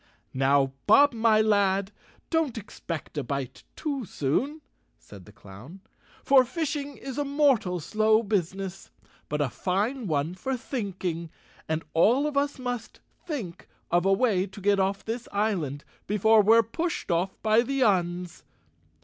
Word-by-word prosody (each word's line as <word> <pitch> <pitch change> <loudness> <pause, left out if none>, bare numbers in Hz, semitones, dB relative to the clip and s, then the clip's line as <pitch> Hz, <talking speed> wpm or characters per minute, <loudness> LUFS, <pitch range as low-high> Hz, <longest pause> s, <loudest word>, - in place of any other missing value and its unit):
"Now, 135 0 +2
Bob 285 -1 +6
my 220 -1 +3
lad, 200 -2 +2 0.4
don't 320 -8 0
expect 170 -7 -6
a - - -3
bite 135 0 -5
too 285 -5 -3
soon," 255 - -2 0.4
said 100 -4 -14
the 105 - -14
clown, 105 - -13 0.4
"for 270 -2 +6
fishing 290 0 -4
is 270 +1 -6
a - - +1
mortal 275 -11 +2
slow 215 +6 +2
business, 195 -2 -3 0.4
but 150 0 -1
a 140 - +1
fine 210 +6 -1
one 155 +1 -1
for 255 +8 -3
thinking, 185 - -4 0.4
and 160 +1 -1
all 235 - +4
of 300 -1 -2
us 285 +1 0
must 245 -2 -5 0.3
think 230 - -6 0.2
of 175 0 +3
a 195 - +2
way 195 -3 +2
to 195 - -12
get 200 0 +2
off 195 +1 -1
this 230 +2 -4
island 180 -10 -1 0.2
before 215 +2 +4
we're 225 +3 +5
pushed 325 - -3
off 175 +3 -1
by 220 +1 +4
the 270 +2 0
Uns." 180 -4 0
205 Hz, 150 wpm, -27 LUFS, 175-250 Hz, 0.4 s, Bob